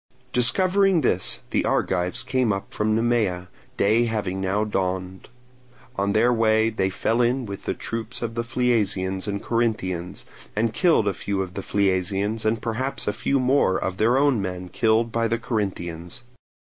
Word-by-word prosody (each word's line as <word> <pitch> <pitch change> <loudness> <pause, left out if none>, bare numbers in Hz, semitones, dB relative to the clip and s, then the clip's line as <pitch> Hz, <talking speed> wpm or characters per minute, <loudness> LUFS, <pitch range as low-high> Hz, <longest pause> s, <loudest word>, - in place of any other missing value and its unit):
Discovering 185 +8 +3
this, 95 -8 0
the - - +1
Argives 90 -1 0
came 130 -3 +1
up 100 0 -4
from 110 0 +1
Nemea, 110 -6 0 0.3
day 110 +4 +3
having 100 -4 -2
now 95 +3 0
dawned. 95 -2 -3 0.7
On 100 -1 0
their 120 +3 +4
way 110 -1 +3
they 95 -4 0
fell 115 +5 0
in 125 +2 +1
with 100 -2 -7
the - - -1
troops 115 +1 -5
of 115 -1 -3
the 115 0 -2
Phliasians 105 -6 0
and 100 -1 -3
Corinthians, 95 -7 -2 0.3
and 110 +1 0
killed 165 - +3
a 100 - +1
few 95 +1 -2
of 90 -1 -9
the 100 - -4
Phliasians 100 +3 0
and 110 +1 +2
had 110 - -18
perhaps 125 +4 -2
a 105 - +1
few 135 +5 0
more 130 -7 +3
of 95 0 -3
their 115 +5 +3
own 140 -6 +3
men 90 -1 -5
killed 115 +3 +2
by 115 0 +1
the 115 +1 0
Corinthians. 95 -3 -4
110 Hz, 170 wpm, -24 LUFS, 95-120 Hz, 0.7 s, their